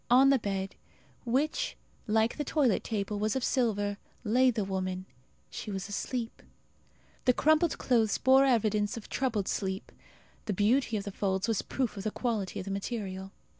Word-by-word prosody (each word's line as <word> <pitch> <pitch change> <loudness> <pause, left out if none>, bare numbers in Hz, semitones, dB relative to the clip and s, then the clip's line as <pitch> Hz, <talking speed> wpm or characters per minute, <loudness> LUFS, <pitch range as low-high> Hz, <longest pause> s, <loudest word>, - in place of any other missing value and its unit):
On 265 +3 +7
the 275 - +4
bed, 195 -2 -3 0.5
which, 270 +6 0 0.3
like 220 +2 +2
the 295 - -1
toilet 275 -6 +2
table, 205 -2 -2
was 215 +2 0
of 265 - -1
silver, 205 -5 +1 0.3
lay 250 +4 +4
the 225 -4 0
woman; 185 -1 -3 0.5
she - - -6
was 195 -1 -4
asleep. 230 +3 -4 0.8
The 250 - +5
crumpled 315 +5 +3
clothes 225 -5 +2
bore 265 +1 +6
evidence 215 -4 +2
of 225 - -9
troubled 220 -7 -1
sleep. 190 -1 -2 0.5
The 210 - -1
beauty 225 +4 +2
of 200 - -3
the 200 - -5
folds 190 +1 -1
was 225 -3 +1
proof 255 -4 -2
of 195 - -5
the 215 - 0
quality 215 -5 -2
of - - -5
the 195 - -4
material. 195 -2 -4
215 Hz, 170 wpm, -30 LUFS, 200-250 Hz, 0.8 s, On